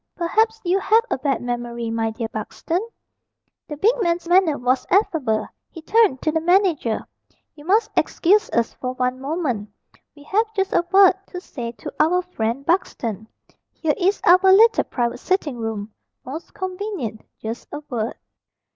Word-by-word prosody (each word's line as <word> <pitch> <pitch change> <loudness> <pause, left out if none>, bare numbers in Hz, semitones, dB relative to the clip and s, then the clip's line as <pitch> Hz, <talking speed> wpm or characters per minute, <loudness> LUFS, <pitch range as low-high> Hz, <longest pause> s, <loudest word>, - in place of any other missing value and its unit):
Perhaps 440 +6 +1
you 365 +2 +2
have 445 +4 +3
a - - 0
bad 275 -3 -1
memory, 240 -1 -3
my 225 0 0
dear 225 +1 -4
Buxton." 325 - -3 0.9
The 295 - -6
big 430 +10 +4
man's 345 -2 0
manner 350 -4 +4
was 255 +1 0
affable. 310 - +1 0.2
He 330 - -11
turned 425 - +3
to 310 - +2
the 320 +1 0
manager. 345 - +2 0.5
"You 295 0 -15
must 425 +5 +2
excuse 410 +5 +2
us 235 -1 0
for 255 0 -4
one 255 0 -2
moment, 270 - -2 0.5
we 290 - -15
have 435 +8 0
just 385 -1 0
a - - +3
word 385 -1 +7
to 360 - -7
say 240 -9 -7
to - - -9
our 360 +4 +3
friend 255 -6 -3
Buxton. 230 - -1 0.5
Here 315 -2 0
is 390 +2 +1
our 360 +1 +7
little 450 +4 +5
private 240 -2 -2
sitting 325 -9 -1
room 220 -2 -5 0.3
most 300 +7 -7
convenient 370 - -4 0.2
just 225 +2 -6
a 295 - -6
word." 230 -3 -3
310 Hz, 160 wpm, -22 LUFS, 240-375 Hz, 0.9 s, word